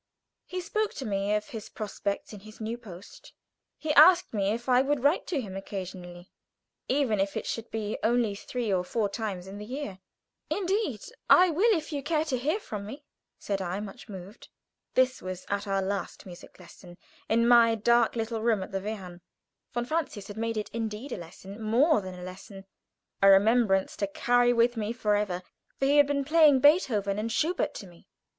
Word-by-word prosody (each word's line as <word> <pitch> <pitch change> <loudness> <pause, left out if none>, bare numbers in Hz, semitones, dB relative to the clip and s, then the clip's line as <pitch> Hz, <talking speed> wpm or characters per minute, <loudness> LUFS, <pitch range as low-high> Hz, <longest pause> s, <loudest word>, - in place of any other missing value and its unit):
He 365 0 -4
spoke 430 +4 -2
to 270 - -5
me 200 -1 0
of 210 0 -3
his 220 -3 -7
prospects 205 -1 -4
in 210 - -8
his 215 +2 -14
new 225 +1 -3
post. 200 -6 -13 0.4
He 310 -1 -1
asked 345 +2 +7
me 200 -2 0
if 235 +4 -3
I 250 0 +5
would 275 -1 -1
write 290 +4 +2
to 330 -6 -1
him 200 -7 -6
occasionally, 185 -2 -7 0.6
even 255 -6 +1
if 195 0 -1
it - - -4
should 230 0 -4
be 215 -1 -3
only 235 -2 +2
three 225 +1 -3
or 180 -1 +1
four 205 +2 -1
times 200 -4 -4
in 195 +2 -9
the - - -7
year. 245 -6 -6 0.5
"Indeed 385 - -1 0.3
I 365 -1 +7
will, 400 +9 +3
if 315 0 -6
you 285 - -2
care 310 +2 0
to 270 -5 -1
hear 310 - 0
from 205 - -7
me," 275 +7 -9 0.3
said 200 -1 -3
I, 185 +1 -3
much 210 +1 -9
moved. 195 +2 -10 0.5
This 255 0 +2
was 185 0 -6
at 200 +1 -2
our 195 -1 0
last 195 0 -4
music 180 0 -12
lesson, 175 0 -14 0.3
in 230 +1 +3
my 235 -1 +6
dark 235 +1 +3
little 225 -1 -2
room 220 -4 +1
at - - -10
the 195 0 -2
Wehrhahn. 190 -4 -7 0.5
Von 240 0 -2
Francius 280 -8 -3
had 205 - -7
made 225 0 -2
it 210 - -4
indeed 225 +3 -4
a - - -3
lesson, 190 +4 -10
more 245 +7 +3
than 185 -1 -8
a 180 - -9
lesson, 195 +2 -10 0.6
a 195 - +7
remembrance 195 0 +4
to 200 - -1
carry 245 +4 +2
with 240 0 +3
me 220 0 -2
forever, 205 -5 0 0.3
for 270 - 0
he 285 +2 +4
had 290 -1 +6
been 280 -1 -1
playing 300 -2 +5
Beethoven 230 - +3
and 225 +2 -2
Schubert 325 +10 0
to - - -7
me. 175 -2 -18
220 Hz, 195 wpm, -28 LUFS, 195-260 Hz, 0.6 s, asked